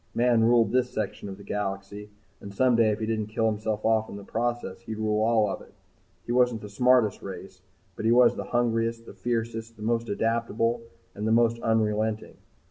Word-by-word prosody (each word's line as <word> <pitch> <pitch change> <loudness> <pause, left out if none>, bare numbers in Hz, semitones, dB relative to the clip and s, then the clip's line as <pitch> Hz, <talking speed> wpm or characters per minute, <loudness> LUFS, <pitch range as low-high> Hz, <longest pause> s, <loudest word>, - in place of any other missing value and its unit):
Man 120 -1 +3
ruled 115 0 +4
this 125 0 +2
section 110 -3 -4
of 95 - -8
the 100 - -12
galaxy, 100 0 -4 0.3
and 100 - -9
someday 115 +1 +3
if 105 - -1
he - - 0
didn't 110 -1 -2
kill 110 +1 -1
himself 110 0 -1
off 110 0 +2
in - - -8
the 100 - -8
process 115 -2 -3
he'd 110 -2 -6
rule 110 0 0
all 110 -1 +3
of 95 - -4
it. - - -17 0.5
He - - -4
wasn't 125 -2 +2
the 105 - -8
smartest 125 0 +3
race 95 -1 -9 0.3
but - - -5
he 115 - +4
was 120 0 +5
the - - -5
hungriest, 115 -1 0
the - - -11
fiercest, 115 -1 -3
the 105 - -10
most 115 +1 0
adaptable, 115 +2 0 0.3
and 105 +2 -4
the - - +2
most 115 0 +3
unrelenting. 110 -1 0
110 Hz, 200 wpm, -26 LUFS, 105-115 Hz, 0.5 s, was